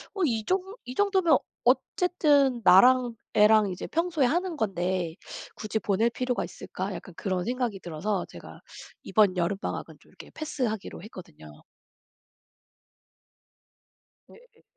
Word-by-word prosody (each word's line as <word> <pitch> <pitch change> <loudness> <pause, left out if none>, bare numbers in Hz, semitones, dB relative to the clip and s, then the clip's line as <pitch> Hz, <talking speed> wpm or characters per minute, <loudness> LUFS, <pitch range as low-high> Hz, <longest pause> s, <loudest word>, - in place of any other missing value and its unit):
어 390 - -3
이 225 -6 0
정 375 +1 +2 0.3
'이 250 +1 -7
정도면 380 -4 +3 0.3
어쨌든 290 - +2
나랑 245 +5 +6 0.2
애랑 210 -1 +5
이제 180 - -6
평소에 330 -4 0
하는 345 +5 -1
건데 180 - -1 0.4
굳이 215 0 -3
보낼 215 +3 +1
필요가 250 0 -2
있을까?' 190 +1 -6
약간 185 - -10
그런 185 -3 -2
생각이 245 -4 -2
들어서 185 +4 -3
제가 - - -12 0.4
이번 200 -4 +3
여름방학은 185 +3 -3
좀 - - -23
이렇게 - - -14
패스하기로 245 - -4
했거든요. 160 - -13 2.7
네 - - -15 0.2
예. - - -26
220 Hz, 270 characters per minute, -27 LUFS, 190-275 Hz, 2.7 s, 나랑